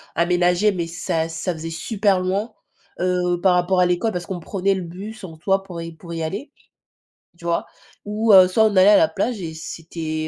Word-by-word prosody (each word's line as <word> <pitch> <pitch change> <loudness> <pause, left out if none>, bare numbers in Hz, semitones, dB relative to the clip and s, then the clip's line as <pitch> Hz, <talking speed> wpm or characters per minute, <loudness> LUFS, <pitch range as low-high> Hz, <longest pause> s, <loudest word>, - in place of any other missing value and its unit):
aménagé, 175 +4 +2
mais 175 -3 -3
ça 165 -1 -2
ça 165 +3 -3
faisait 165 0 -6
super 195 +3 0
loin, 200 +5 -2 0.5
heu, 180 -1 0
par 185 -1 +4
rapport 180 +1 +2
à - - +5
l'école 180 +5 0
parce 175 0 -4
qu'on 185 -2 -5
prenait 195 +3 -1
le 190 - -3
bus 195 +6 -9
en 165 -4 -8
soit 195 +4 0
pour 175 -3 -7
y 165 0 -6
pour 170 +1 -10
y 165 - -3
aller, 205 - -5 0.9
tu 170 - -14
vois? 170 0 0 0.4
Ou 210 +1 +2
heu, 185 -1 +9
soit 220 +4 +3
on 215 -2 +1
allait 190 +2 +7
à 210 - +7
la - - +5
plage 205 +8 -2
et 165 -2 -5
c'était 160 -1 -5
180 Hz, 210 wpm, -21 LUFS, 165-195 Hz, 0.9 s, heu